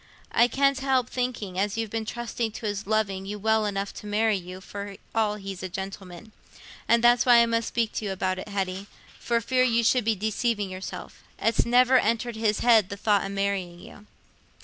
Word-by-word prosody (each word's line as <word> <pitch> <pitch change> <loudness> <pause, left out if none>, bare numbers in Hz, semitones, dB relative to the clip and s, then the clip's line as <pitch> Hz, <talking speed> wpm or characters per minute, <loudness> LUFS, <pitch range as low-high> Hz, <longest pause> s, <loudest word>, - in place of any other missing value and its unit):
I 235 - +4
can't 275 +2 +2
help 260 -2 +1
thinking 230 -7 -3
as 205 +2 -1
you've 225 -2 -3
been 225 -1 -3
trusting 235 -1 -3
to 225 - -7
his 205 -1 -3
loving 195 -3 -1
you 210 +1 -4
well 220 +1 +1
enough 200 0 -3
to 210 - -9
marry 215 +1 +2
you, 185 0 -7
for 200 0 -8 0.2
all 215 -2 +1
he's 195 -2 -7
a 185 - -5
gentleman. 190 +1 -8 0.6
And 235 0 +3
that's 240 0 +5
why 240 -2 +6
I - - +3
must 230 0 0
speak 230 -2 -1
to 215 - -4
you 200 - -2
about 185 -1 -2
it, - - -7
Hetty, 195 0 -3 0.3
for 235 -1 0
fear 255 +2 +2
you 235 -2 +2
should 250 +2 +3
be 220 0 +1
deceiving 215 0 -1
yourself. 185 +1 -8 0.2
It's 230 - +1
never 250 +2 +5
entered 235 +2 -1
his 220 -1 0
head 225 -5 +5
the 200 - -6
thought 205 -1 +2
o' 195 - -4
marrying 195 -3 -2
you." 205 +3 -14
215 Hz, 205 wpm, -26 LUFS, 195-235 Hz, 0.6 s, why